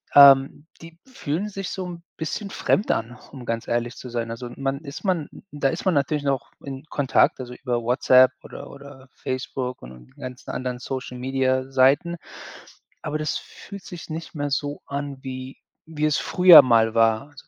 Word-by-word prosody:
ähm, 140 +1 +7
die 165 0 -13
fühlen 210 - -4
sich 195 -1 -5
so 185 - -4
'n 170 -1 -9
bisschen 180 +5 -4
fremd 205 - +1
an, 120 +2 -3
um 135 -3 -10
ganz 115 -1 -3
ehrlich 120 +1 -1
zu 125 - -9
sein. 115 -1 -3
Also, 120 +1 -6
man 135 0 -2
ist 140 -3 -9
man 180 -7 -1 0.2
da 145 -2 0
ist 165 - -4
man 185 - +2
natürlich 145 +1 0
noch 135 -3 -2
in 135 0 -7
Kontakt, 140 -3 +2
also, 125 -1 -7
über 120 -3 -2
WhatsApp 130 +1 +5
oder - - -10
oder 140 -1 -13
Facebook 130 0 -4
und 60 0 -12
die 65 - -20
ganzen 130 -1 -7
anderen 125 -1 -4
Social-Media-Seiten, 130 +4 0 0.8
aber 150 0 -3
das 150 -1 -1
fühlt 200 -2 -11
sich 175 -2 -9
nicht 160 +1 -7
mehr 145 -1 -2
so 145 +1 -2
an, 140 -1 -4
wie 130 0 -7 0.3
wie 155 -1 -2
es 155 -1 +2
früher 180 -3 +8
mal 115 -3 +3
war. 115 +5 +2
So - - -14
135 Hz, 175 wpm, -23 LUFS, 125-155 Hz, 0.8 s, früher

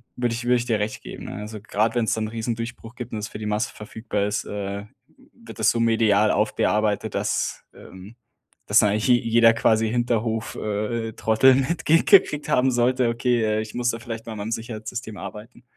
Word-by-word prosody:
würde 120 -1 -1
ich 120 - -5
würde 125 +1 +4
ich 120 - -3
dir 115 -3 0
recht 105 +1 -3
geben, - - -9
ne, - - -7
also 105 +1 -7
grad 110 +2 0
wenn's 115 -2 +1
da - - -2
'n 110 - -1
Riesendurchbruch 115 +1 -5
gibt 120 -1 -8
und - - -2
das 105 - -5
für - - -8
die 110 - -5
Masse 105 +3 -1
verfügbar 105 -1 -4
ist, 105 0 -2
äh, 100 0 -5 0.5
wird - - -13
das - - +4
so 120 - -2
medial 110 -2 +3
aufgearbeitet, 105 0 0
dass, - - -1
ähm 95 +4 -13 0.5
dass - - +3
da 105 - +4
eigentlich 105 +4 0
je 125 - +6
jeder 115 0 +4
quasi 110 0 +2
Hinterhof, 115 -1 -1
äh, 110 +2 -3
Trottel 110 +5 +4
mitge 160 +4 +2
gekriegt 150 -7 +4
haben 130 +1 +3
sollte: 120 0 +2
„Okay, 120 0 +1
äh, 110 0 +1
ich 110 - -8
muss 120 0 0
da 115 - -1
vielleicht 115 0 -7
mal 115 - -5
an - - -8
meinem 105 +2 -4
Sicherheitssystem 115 0 -5
arbeiten.“ 105 +6 -10
115 Hz, 205 wpm, -23 LUFS, 105-120 Hz, 0.5 s, je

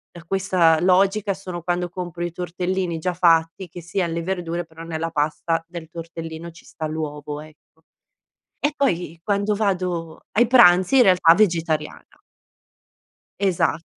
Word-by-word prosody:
da 170 - -11
questa 180 -3 +2
logica, 195 +3 +2
sono 185 -3 -7
quando 175 0 -1
compro 175 -1 -6
i 175 - -3
tortellini 180 0 -3
già 180 +2 -2
fatti, 165 +1 +2
che 175 +1 -10
sia 175 +2 -2
alle 170 0 -3
verdure, 175 -1 -3
però 160 0 -12
nella 165 0 -3
pasta 155 +1 -1
del 170 -2 -9
tortellino 165 0 -8
ci 165 - -17
sta 160 - -6
l'uovo, 150 -1 -5
ecco. 155 +1 -18 0.8
E, 295 0 0
poi, 175 - -1
quando 205 0 0
vado 180 -5 -2
ai 240 +3 +4
pranzi, 190 -2 +6
in 250 - +7
realtà, 180 -3 +6
vegetariana. 165 -5 -1 1.2
Esatt 185 -4 +1
175 Hz, 140 wpm, -22 LUFS, 165-185 Hz, 1.2 s, in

